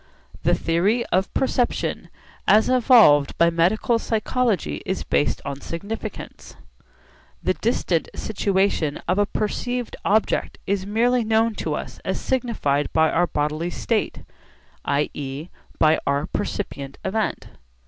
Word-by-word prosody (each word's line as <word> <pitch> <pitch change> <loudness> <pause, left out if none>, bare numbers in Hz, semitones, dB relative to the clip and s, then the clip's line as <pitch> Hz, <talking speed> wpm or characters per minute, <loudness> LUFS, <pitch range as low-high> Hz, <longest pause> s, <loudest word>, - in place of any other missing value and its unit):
The - - +3
theory 195 +9 +1
of 190 +2 +1
perception 255 -2 0 0.4
as 215 +3 +5
evolved 230 - +5
by 170 0 +4
medical 195 +8 +2
psychology 225 -1 -1
is 190 - -3
based 145 - 0
on 140 0 -5
significance. 200 +7 -7 0.9
The - - +2
distant - - 0
situation 190 -7 0
of 185 +3 +1
a 205 - +3
perceived 245 +4 -2
object 215 +2 +1
is 195 -1 -1
merely 240 +3 +2
known 225 +1 +2
to - - -1
us - - -7
as - - -2
signified 225 - -1
by 160 0 +3
our 175 +1 +2
bodily 150 +3 -1
state, 120 - -2 0.6
i.e. 140 +2 -2 0.3
by 155 0 +4
our 140 +1 +1
percipient 140 -8 -4
event. 215 +3 -2
195 Hz, 120 wpm, -23 LUFS, 155-225 Hz, 0.9 s, as